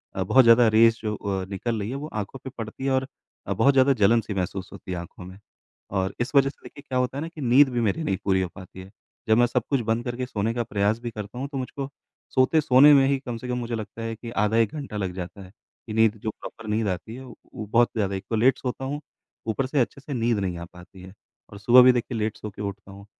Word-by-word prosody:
अ, 95 - 0
बहुत 125 +7 +5
ज़्यादा 115 0 +6
रेज़ 115 +1 +5
जो 105 0 -1
अ, 95 -2 -3
निकल 110 +3 -3
रही 100 +2 -3
है 135 - -4
वो 145 +2 -5
आँखों 105 +5 -5
पे 130 - -6
पड़ती 115 +4 -6
है 135 - +1
और 130 0 +1 0.4
अ, - - 0
बहुत 140 +1 +4
ज़्यादा 135 +1 +5
जलन-सी 110 +1 +3
महसूस 95 0 -3
होती - - -9
है 90 - -2
आँखों 85 +1 -9
में। 95 +2 -12 0.5
और 95 -1 -1
इस 130 +4 -3
वजह 135 0 +5
से - - -15
देखिए 145 - -12
क्या 130 - -1
होता 125 +2 -1
है - - -3
ना 165 - -3
कि 160 -3 -10
नींद 130 +2 +5
भी 120 -2 -1
मेरी 115 +9 0
नहीं 95 -10 -1
पूरी 95 -1 +2
हो 90 - -2
पाती 95 -1 -11
है। 95 - -13 0.4
जब 110 - +5
मैं 120 - +5
सब 120 -1 -1
कुछ 135 -4 +1
बंद 115 +1 +1
करके 125 +1 -3
सोने 115 -1 -2
का 120 0 -1
प्रयास 105 +2 0
भी 120 -1 -5
करता 105 +2 -8
हूँ, 135 - -3
तो 140 -1 -6
मुझको 135 +1 -5 0.5
सोते 130 +5 +4
सोने 145 +2 +7
में 135 -1 +6
ही 140 -1 +1
कम 120 -3 -6
से 125 - -8
कम 125 0 -2
मुझे 120 -1 -3
लगता 110 +1 -7
है 115 0 -4
कि 115 +1 -9
आधा 110 -1 +1
1 115 -2 +2
घंटा 140 -8 -6
लग 95 -3 -3
जाता 90 +2 -7
है। 95 - -14 0.4
कि 110 - -5
नींद 110 0 +3
जो 110 - -1
प्रॉपर 110 +1 -10
नींद 110 0 0
आती 110 +5 -5
है, 130 - -9
उ 125 - -11 0.2
वो 110 - -5
बहुत 120 +3 +3
ज़्यादा 100 -3 -1
एक 95 - -5
तो 115 - 0
लेट 125 +4 +4
सोता 130 +1 -4
हूँ, 145 +2 -3 0.5
ऊपर 120 +4 0
से 140 +1 0
अच्छे 135 +3 -3
से 140 0 -6
नींद 115 -2 +1
नहीं 90 -3 -2
आ 85 - -6
पाती 90 +1 -14
है 95 +1 -12 0.4
और 100 - -11
सुबह 120 +4 +7
भी 130 - +8
देखिए 120 0 -2
लेट 110 0 -2
सो 105 - -7
के 100 - -10
उठता 100 -1 -6
हूँ। 100 +1 -12
115 Hz, 275 wpm, -25 LUFS, 100-130 Hz, 0.5 s, भी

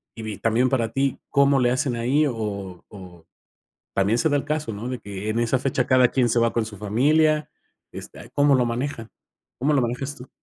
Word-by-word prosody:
y 115 - -8
vi 110 -2 -5
también 115 +3 +2
para 115 -4 0
ti, 135 +2 -1
¿cómo 140 -1 +3
le 125 -1 +3
hacen 130 0 0
ahí? 130 +6 +2
O 100 -7 -5
o 90 -5 -13 0.7
también 100 +4 +2
se 160 - +2
da 145 - +2
el 140 - -4
caso, 150 -4 -2
¿no?, 110 +3 -6
de 125 -1 -4
que 100 0 -6
en 110 +2 0
esa 120 +2 +1
fecha, 130 -1 0
cada 130 -1 +5
quien 125 -2 +1
se 115 - +2
va 115 0 +2
con 115 - +1
su 105 -2 -9
familia. 150 +9 +2 0.4
Este, - - -10
¿cómo 145 -1 +4
lo 125 - +3
manejan? 120 -1 -4 0.5
¿Cómo 145 +4 +1
lo 140 - +3
manejas 125 +4 -3
tú? 125 -1 -12
125 Hz, 215 wpm, -23 LUFS, 110-140 Hz, 0.7 s, cada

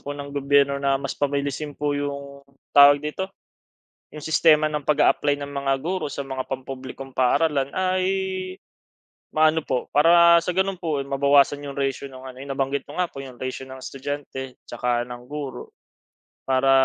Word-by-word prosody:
po 145 0 -6
ng 140 0 -7
gobyerno 140 0 +2
na 140 -1 +2
mas 135 0 -4
pabilisin 145 +1 -2
po 145 0 -1
'yong 140 -1 -4 0.3
tawag 145 0 +8
dito? 190 +6 -3 0.8
'Yong 150 - -10
sistema 155 -1 +4
ng 150 -1 -2
pag-a-apply 145 0 +2
ng 140 - -5
mga 140 -1 0
guro 175 +1 -3
sa 140 -1 -5
mga 130 -1 -3
pampublikong 130 0 -7
paaralan 140 +2 +2
ay 185 +2 0 1.3
maano 155 0 +3
po, 125 -2 -2
para 170 +3 +6
sa 180 - -1
gano'n 190 +1 0
po, 155 -5 -2
eh, - - -7
mabawasan 140 +1 +3
'yong 140 - -6
ratio 135 0 -2
ng 130 -2 -10
ano, 125 - -12
yung 140 - -4
nabanggit 135 +1 -1
ko 150 +5 -4
nga 180 - 0
po - - -14
'yong 130 -3 -9
ratio 130 +1 -4
ng 130 0 -10
estudyante 135 -1 -6
tsaka 120 -1 0
ng 120 0 -9
guro 145 -1 -7 0.7
para, 135 0 +2
140 Hz, 165 wpm, -23 LUFS, 135-150 Hz, 1.3 s, tawag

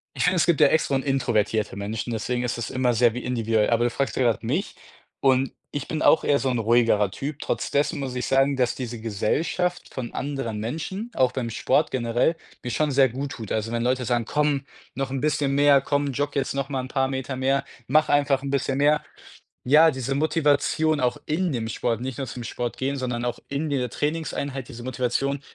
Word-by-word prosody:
Ich - - +1
finde, 180 +1 +3
es 170 - +4
gibt 170 -3 +2
ja 145 - +8
extro 155 -1 +1
und 135 -1 +1
introvertierte 110 -6 0
Menschen, 105 +4 -4
deswegen 120 +3 -2
ist 120 -1 -2
es 115 - -3
immer 125 -1 +1
sehr 120 0 +3
wi 125 - -3
individuell, 115 -3 +1
aber 115 0 +3
du - - +2
fragst 135 +3 -2
ja - - 0
grad 115 -3 +1
mich 150 - -2 0.5
und 135 -1 +3 0.2
ich 145 -2 -4
bin 155 -1 -2
auch - - +5
eher 145 - +3
so 135 - -1
'n 120 - 0
ruhigerer 115 -3 +3
Typ. 140 +9 -5
Trotz - - -2
dessen 145 +2 +1
muss 135 -2 -4
ich 125 0 -3
sagen, 135 +1 +3
dass 125 -2 +1
diese 120 -3 -5
Gesellschaft 155 - -1
von 125 -3 -6
anderen 135 -6 -3
Menschen, 165 - -4
auch 130 -1 +3
beim 125 -3 -3
Sport 145 +6 +1
generell, 120 +5 +1 0.3
mir 125 - -5
schon 150 +5 0
sehr 135 -1 +4
gut 135 +4 -5
tut. 110 -4 -7
Also, 110 +1 -1
wenn 115 0 -1
Leute 125 +1 0
sagen: 120 -1 0
„Komm, 145 0 0 0.3
noch 135 -1 -3
'n 135 0 -2
bisschen 145 -1 0
mehr, 140 -1 +5
komm, 145 0 0
jogge 145 +2 -2
jetzt 140 - -1
noch 140 0 -2
mal 135 -2 -2
'n 130 - -8
paar 135 -1 +1
Meter 130 0 -3
mehr, 135 +1 +1 0.2
mache 150 +3 +3
einfach 140 -2 +2
'n 140 - -3
bisschen 140 -1 0
mehr." 150 +1 +3 0.6
Ja, 155 +5 +6
diese 130 0 -2
Motivation, 155 0 +2
auch 125 -3 0
in 170 +1 0
dem 115 -3 -2
Sport 115 0 -1
nicht 130 0 -5
nur 135 - -3
zum 125 0 -7
Sport 120 +1 -4
gehen, 135 +2 -1
sondern 125 -2 -2
auch 120 - -2
in 145 +3 -2
dieser 125 -4 -1
Trainingseinheit, 145 -3 -3
diese 120 -3 -9
Motivation 130 +2 -1
135 Hz, 220 wpm, -24 LUFS, 120-145 Hz, 0.6 s, ja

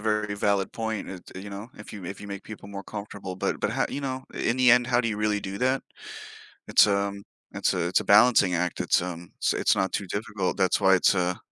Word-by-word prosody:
very 105 -1 -1
valid 100 -1 0
point, 110 -3 -4
uh, 95 - -7 0.2
you 100 +1 -8
know, 100 +4 -7
if 105 - -11
you 100 -4 -8
if 95 +3 -7
you 100 - -9
make 100 0 -7
people 105 -2 -10
more 100 -1 -7
comfortable, 100 -3 -7
but 90 - -2
but - - 0
how, - - 0
you - - -4
know, 130 -1 -4
in 115 - -1
the 125 -1 +5
end, 125 0 +5
how 120 -1 +3
do 115 - -1
you 105 - -2
really 105 -1 0
do 95 0 -6
that, 130 +1 +1 0.8
it's, - - +6
um, 100 0 -1 0.3
it's - - 0
a 85 -1 0
it's - - +2
a - - -5
balancing 105 -3 +5
act, 90 +1 -1
it's, - - +2
um, 85 -1 -7 0.2
it's - - +2
not 95 - 0
too 100 - -2
difficult, 100 0 -3
that's 95 -2 +2
why 95 0 +5
it's 95 - +4
a 90 -1 0
100 Hz, 240 wpm, -26 LUFS, 95-110 Hz, 0.8 s, it's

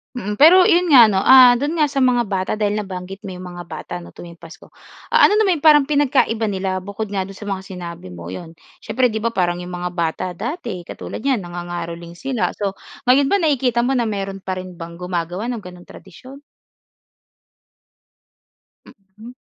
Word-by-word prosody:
Mm, 210 -4 -5
pero 350 +6 +8
'yon 360 -2 +3
nga 265 -6 +8
'no, 190 - +1
ah, 250 +3 +7
do'n 290 +5 -2
nga 310 -2 +3
sa 275 - -1
mga 250 -2 +3
bata 190 -3 -3
dahil 210 0 -1
nabanggit 190 -1 -7
mo 185 - -7
'yong 180 - -9
mga 175 -1 -8
bata 155 -2 -9
ano 170 - -14
tuwing 170 -1 -12
Pasko. 165 -1 -14 0.4
Ah, - - +6
ano 415 - +1
naman 390 -7 +2
'yong 290 - -11
parang 295 -2 +7
pinagkaiba 255 -6 +1
nila 190 -2 -2
bukod 200 +2 -6
nga 190 -2 -2
do'n 195 - -11
sa - - -10
mga 195 - -2
sinabi 175 - -8
mo? 85 -1 -9
'Yon, 165 - -9 0.2
siyempre 245 +2 0
'di 220 - -3
ba, 230 +1 -2
parang 175 -1 0
'yong 180 0 -8
mga 180 0 -4
bata 170 0 -2
dati, 230 - -5
katulad - - -7
niyan 260 -5 0
nangangaroling 175 -1 -7
sila. 255 +5 -2
So, 200 -2 -2 0.3
ngayon 265 +2 +4
ba 400 - +2
nakikita 255 -6 +1
mo 250 - 0
na 235 - 0
mayro'n 195 -2 -4
pa 190 0 -4
rin 185 -1 -9
bang 170 0 -8
gumagawa 180 +5 -4
ng 240 - -4
gano'n 180 -3 -12
tradisyon? 255 +9 -13 2.5
Mhm. 210 +2 -15
195 Hz, 190 wpm, -20 LUFS, 180-250 Hz, 2.5 s, pero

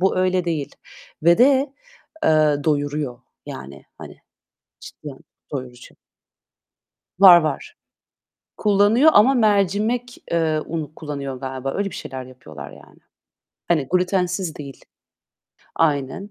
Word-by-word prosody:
bu 190 +1 +1
öyle 185 -1 +1
değil 160 -5 -3 0.5
ve 170 +2 +5
de, 270 +2 +4 0.5
eee, 150 -2 +3
doyuruyor. 145 -4 -1 0.3
Yani, 65 +1 -9
hani, - - -11 0.6
cidden 140 -3 -11 0.3
doyurucu. 125 -3 -8 1.2
Var, 180 -3 +9
var. 155 -3 -4 0.8
Kullanıyor 210 +8 +4
ama 250 +6 +6
mercimek, 215 +2 +1
eee, 160 -2 +1
unu 155 -2 -5
kullanıyor 140 -4 -6
galiba 135 0 -5
öyle 200 0 -2
bir - - -10
şeyler 130 -1 -7
yapıyorlar 80 - -11
yani. - - -17 0.7
Hani 155 -6 +1
glütensiz 180 -1 0
değil. 140 -2 -10 0.9
Aynen. 150 +5 -1
160 Hz, 105 wpm, -21 LUFS, 140-195 Hz, 1.2 s, Var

